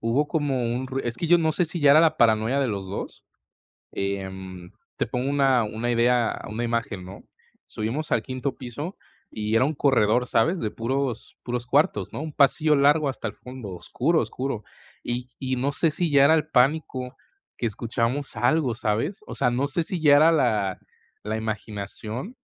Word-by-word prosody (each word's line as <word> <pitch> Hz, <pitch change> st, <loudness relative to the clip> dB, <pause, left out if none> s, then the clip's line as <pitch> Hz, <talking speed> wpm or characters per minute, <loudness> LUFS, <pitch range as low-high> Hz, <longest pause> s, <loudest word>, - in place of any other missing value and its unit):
hubo 120 Hz, +6 st, +1 dB
como 145 Hz, -6 st, 0 dB
un 130 Hz, +2 st, -3 dB
rui 135 Hz, +1 st, -3 dB
es 120 Hz, -1 st, -2 dB
que 170 Hz, -, -2 dB
yo 175 Hz, +2 st, +6 dB
no 160 Hz, -2 st, +1 dB
sé 180 Hz, -, +1 dB
si 165 Hz, +2 st, -4 dB
ya 145 Hz, -1 st, +6 dB
era 150 Hz, +3 st, +8 dB
la 160 Hz, -1 st, +3 dB
paranoia 115 Hz, +1 st, +3 dB
de 135 Hz, -2 st, +1 dB
los 100 Hz, -3 st, -3 dB
2, 100 Hz, -, -6 dB, 0.7 s
em, 95 Hz, -2 st, -5 dB, 0.2 s
te -, -, -1 dB
pongo 125 Hz, +2 st, -2 dB
una 135 Hz, -4 st, +3 dB
una 110 Hz, +3 st, -3 dB
idea 120 Hz, 0 st, +2 dB
una 110 Hz, +3 st, -4 dB
imagen, 115 Hz, -5 st, -2 dB
¿no? 95 Hz, +2 st, -11 dB, 0.4 s
Subimos 120 Hz, +9 st, -4 dB
al -, -, +3 dB
quinto 130 Hz, +1 st, -4 dB
piso 145 Hz, -, -6 dB, 0.4 s
y 110 Hz, +1 st, -2 dB
era 115 Hz, -, +4 dB
un 150 Hz, -, -1 dB
corredor, 125 Hz, -4 st, +2 dB
¿sabes?, 160 Hz, +12 st, +2 dB
de 110 Hz, -, -2 dB
puros 125 Hz, 0 st, -3 dB
puros 120 Hz, 0 st, -3 dB
cuartos, 125 Hz, -, +1 dB
¿no?, -, -, -4 dB
un 155 Hz, 0 st, -5 dB
pasillo 150 Hz, +2 st, +3 dB
largo 145 Hz, +1 st, +4 dB
hasta 130 Hz, -, -4 dB
el -, -, -5 dB
fondo 125 Hz, -4 st, -9 dB
oscuro, 125 Hz, -, 0 dB
oscuro, 130 Hz, -5 st, -4 dB, 0.4 s
y 125 Hz, +1 st, -3 dB
y 130 Hz, -1 st, -1 dB
no 130 Hz, +3 st, 0 dB
sé 160 Hz, +3 st, +1 dB
si 165 Hz, +1 st, -1 dB
ya 140 Hz, -1 st, +6 dB
era 160 Hz, +3 st, +6 dB
el 155 Hz, -, 0 dB
pánico 130 Hz, -1 st, +1 dB, 0.4 s
que -, -, -2 dB
escuchamos 115 Hz, +5 st, -2 dB
algo, 125 Hz, -1 st, +1 dB
¿sabes? 120 Hz, -, -1 dB
O -, -, -8 dB
sea, -, -, +1 dB
no 125 Hz, +3 st, 0 dB
sé 145 Hz, +4 st, -1 dB
si 175 Hz, +2 st, -3 dB
ya 145 Hz, -2 st, +6 dB
era 160 Hz, +3 st, +6 dB
la 110 Hz, -, +1 dB, 0.4 s
la 110 Hz, +1 st, -2 dB
imaginación 110 Hz, -, -5 dB
125 Hz, 190 wpm, -25 LUFS, 110-145 Hz, 0.7 s, era